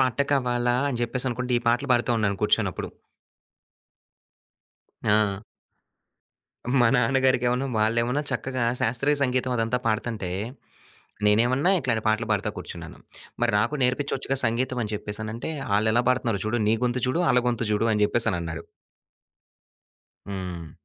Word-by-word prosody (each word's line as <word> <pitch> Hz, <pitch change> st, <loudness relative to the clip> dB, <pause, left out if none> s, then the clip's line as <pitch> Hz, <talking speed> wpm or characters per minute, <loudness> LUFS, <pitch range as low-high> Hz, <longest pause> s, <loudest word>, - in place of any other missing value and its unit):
పాట 130 Hz, -2 st, +1 dB
కావాలా? 125 Hz, -2 st, +1 dB
అని 125 Hz, -4 st, -3 dB
జెప్పేసనుకుంటా 125 Hz, 0 st, -1 dB
ఈ -, -, -8 dB
పాటలు 125 Hz, +3 st, +1 dB
పాడుతూ 120 Hz, 0 st, +2 dB
ఉన్నాను 100 Hz, -2 st, 0 dB
కూర్చోని -, -, +2 dB
అప్పుడు. -, -, -6 dB, 2.1 s
ఆ! 105 Hz, -2 st, +2 dB, 1.4 s
మా 120 Hz, -, +5 dB
నాన్నగారికేమోను 130 Hz, 0 st, +2 dB
వాళ్ళేమన్నా 115 Hz, +5 st, +1 dB
చక్కగా 130 Hz, -2 st, -2 dB, 0.2 s
శాస్త్రీయ 125 Hz, +6 st, +1 dB
సంగీతం 130 Hz, -1 st, 0 dB
అదంతా 115 Hz, +2 st, +1 dB
పాడతంటే, 110 Hz, -4 st, -1 dB, 1.0 s
నేనేమన్నా 125 Hz, -, +3 dB
ఇట్లాంటి 120 Hz, -6 st, -1 dB
పాటలు 110 Hz, +1 st, +1 dB
పాడుతా 100 Hz, -1 st, 0 dB
కూర్చున్నాను. -, -, -8 dB, 0.4 s
మరి 120 Hz, -, +2 dB
నాకు 115 Hz, +8 st, 0 dB
నేర్పి‌చొచ్చుగా 135 Hz, +1 st, 0 dB
సంగీతం 125 Hz, +3 st, 0 dB
అని 105 Hz, -1 st, -4 dB
జెప్పేసనంటే, 110 Hz, +7 st, -5 dB, 0.2 s
ఆళ్ళెలా 110 Hz, +3 st, +2 dB
పాడుతున్నారో 120 Hz, -5 st, 0 dB
చూడు, 115 Hz, +3 st, 0 dB
నీ 110 Hz, -, +4 dB
గొంతు 125 Hz, 0 st, -1 dB
చూడు, 145 Hz, +7 st, 0 dB
ఆళ్ళ 125 Hz, 0 st, +4 dB
గొంతు 120 Hz, -1 st, -1 dB
జూడు 110 Hz, +2 st, +1 dB
అని 105 Hz, -1 st, +1 dB
జెప్పేసనన్నాడు. 85 Hz, -8 st, -1 dB, 1.6 s
హ్మ్. 90 Hz, -4 st, -6 dB
120 Hz, 120 wpm, -25 LUFS, 110-125 Hz, 2.1 s, మా